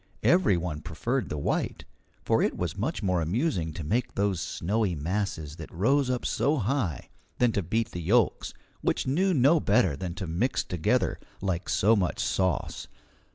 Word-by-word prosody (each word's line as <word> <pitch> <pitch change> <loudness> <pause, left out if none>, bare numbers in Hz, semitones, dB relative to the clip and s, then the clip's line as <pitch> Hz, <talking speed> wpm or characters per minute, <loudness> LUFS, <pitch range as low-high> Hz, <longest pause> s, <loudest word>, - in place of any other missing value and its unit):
Every 175 - +4
one 80 -3 -4
preferred 115 - -2
the 75 - -3
white, 70 - -2 0.4
for - - +3
it - - 0
was - - -2
much - - -2
more 90 -3 +1
amusing 90 - 0
to 80 - -6
make 120 +11 -1
those 100 -4 0
snowy 100 0 -1
masses 80 -2 -3
that - - -9
rose 130 +9 +2
up 125 -1 -1
so 145 +4 +1
high 110 - -1 0.3
than 125 -2 +3
to 100 - 0
beat 110 +6 -1
the 90 - -5
yolks, 105 +5 +2 0.3
which - - 0
knew 180 +9 +2
no 150 +1 +4
better 95 - +3
than 85 +4 -5
to 95 -1 -4
mix 90 +11 0
together 105 +8 0 0.2
like 95 -2 -2
so 110 +4 +4
much 95 -4 0
sauce. 90 -3 -1
100 Hz, 170 wpm, -27 LUFS, 85-125 Hz, 0.4 s, Every